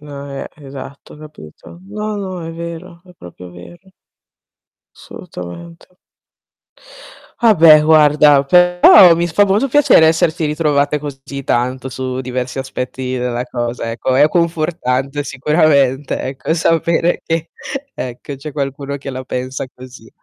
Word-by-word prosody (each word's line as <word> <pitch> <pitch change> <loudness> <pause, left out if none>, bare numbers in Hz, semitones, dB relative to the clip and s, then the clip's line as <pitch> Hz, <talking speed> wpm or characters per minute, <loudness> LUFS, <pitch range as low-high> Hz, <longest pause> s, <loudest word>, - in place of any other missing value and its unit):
No, 140 -1 -9
ehm, 140 - -6
esatto, 140 -1 -11
ho - - -15
capito. 150 - -14
No, 210 +1 -5
no, 185 -4 -6
è 165 - -7
vero, 170 +1 -9
è 180 - -17
proprio 90 - -13
vero. 175 - -15 1.0
Assolutamente. 165 - -11 1.5
Ah 230 - +6
beh, 160 -3 +7
guarda, 150 -2 +5
però 180 +2 +6
mi 170 +1 0
fa 190 +4 +2
molto 205 +6 +1
piacere 275 - +4
esserti 160 +1 +1
ritrovate 150 -1 0
così 140 -1 -8
tanto, 130 +1 -2
su 130 0 -5
diversi 130 0 -4
aspetti 130 0 -5
della 125 -1 -2
cosa, 120 -1 -4
ecco. 120 +3 -2
È 145 +3 +5
confortante 155 -5 -1
sicuramente, 140 -1 +1
ecco, 135 +4 -3
sapere 165 +1 0
che, 165 0 -2 0.4
ecco, 125 - -7
c'è 145 +3 -9
qualcuno 140 0 -4
che 140 0 -7
la 130 0 -7
pensa 130 +1 -5
così. 125 -3 -14
145 Hz, 130 wpm, -16 LUFS, 130-170 Hz, 1.5 s, beh